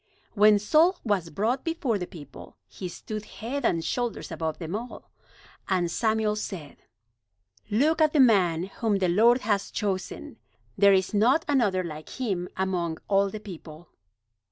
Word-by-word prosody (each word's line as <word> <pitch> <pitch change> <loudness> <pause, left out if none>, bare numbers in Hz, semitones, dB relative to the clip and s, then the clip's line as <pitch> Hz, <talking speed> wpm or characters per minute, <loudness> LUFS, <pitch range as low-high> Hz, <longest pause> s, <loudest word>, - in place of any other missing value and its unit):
When 210 0 +6
Saul 315 - +3
was 200 -7 0
brought 220 - -1
before 295 -10 -1
the 180 - -4
people 145 -7 -12
he 185 - -7
stood 215 +4 -7
head 250 +6 -5
and 165 -7 +1
shoulders 240 -6 -3
above 160 -1 -3
them 170 +2 -5
all. 240 +3 -8 0.6
And 180 -3 +1
Samuel 220 +1 +1
said: 185 -8 -6 0.9
"Look 295 +10 +2
at 310 -1 +4
the 300 - +1
man 185 -10 +4
whom 205 +2 -1
the 185 -2 +1
Lord 235 +7 +4
has 205 -2 0
chosen! 195 -3 -4 0.4
There 200 0 +5
is 190 0 +2
not 250 +10 +3
another 220 -10 +2
like 155 -2 -8
him 190 -8 -2
among 180 -4 -1
all 200 0 +3
the 215 - -7
people!" 175 -5 -11
205 Hz, 155 wpm, -26 LUFS, 180-230 Hz, 0.9 s, When